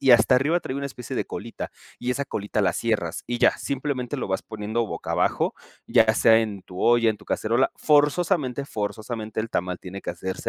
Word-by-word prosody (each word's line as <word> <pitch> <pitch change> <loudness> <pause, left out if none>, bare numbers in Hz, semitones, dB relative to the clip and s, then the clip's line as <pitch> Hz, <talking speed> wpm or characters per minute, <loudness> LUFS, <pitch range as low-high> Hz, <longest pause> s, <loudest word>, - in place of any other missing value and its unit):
y 135 -2 +4
hasta 130 +2 +6
arriba 155 +7 +2
trae 130 - -5
una 140 0 -2
especie 125 -4 -7
de - - 0
colita, - - -6 0.3
y 125 +1 -2
esa 140 +2 -1
colita 105 -3 -2
la 90 -3 +3
cierras 100 -8 -1
y 120 0 -2
ya. - - +4
Simplemente 140 -1 -2
lo 130 - -3
vas 95 0 -1
poniendo 110 +2 -2
boca - - -6
abajo, - - +1 0.3
ya 110 -1 +5
sea 115 0 +6
en 105 -4 -4
tu 90 0 -9
olla, 120 -1 +5
en 110 - -3
tu - - -17
cacerola. 120 +4 +1
Forzosamente, 150 -2 +2
forzosamente 110 -1 -4
el 110 +1 -4
tamal 90 0 -1
tiene 95 +2 -8
que - - -4
hacerse 95 +2 -4
115 Hz, 205 wpm, -25 LUFS, 105-135 Hz, 0.3 s, hasta